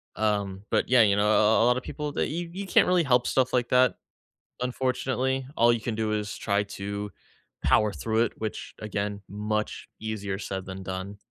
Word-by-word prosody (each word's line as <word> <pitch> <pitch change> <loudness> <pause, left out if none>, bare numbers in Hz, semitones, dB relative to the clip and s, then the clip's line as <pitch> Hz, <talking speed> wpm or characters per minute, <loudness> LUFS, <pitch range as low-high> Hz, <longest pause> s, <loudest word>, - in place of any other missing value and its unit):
Um, 100 -3 -1
but - - +1
yeah, 125 -1 +6
you 100 -2 +5
know 105 +1 +2
a - - +4
a 110 +1 +4
a - - +4
a - - +4
lotta 125 +1 +3
people 150 +3 -5
that - - 0
you 170 +2 -4
you 195 +3 -5
can't - - +5
really 180 -1 +4
help 125 -4 +3
stuff 130 -1 +1
like 125 -1 +1
that, 125 0 +4 0.7
unfortunately. 130 +1 -1
All 120 +1 +5
you 120 -1 0
can 115 0 -3
do 110 0 -1
is 105 -1 -2
try 100 0 +1
to 100 0 -5 0.5
power 105 -1 +3
through 110 0 +1
it, - - -5
which 110 -1 -5
again 105 -1 -3
much 105 +1 -3
easier 105 -3 -4
said 95 -2 -4
than 95 0 -7
done. 95 +2 -5
110 Hz, 200 wpm, -27 LUFS, 100-125 Hz, 0.7 s, yeah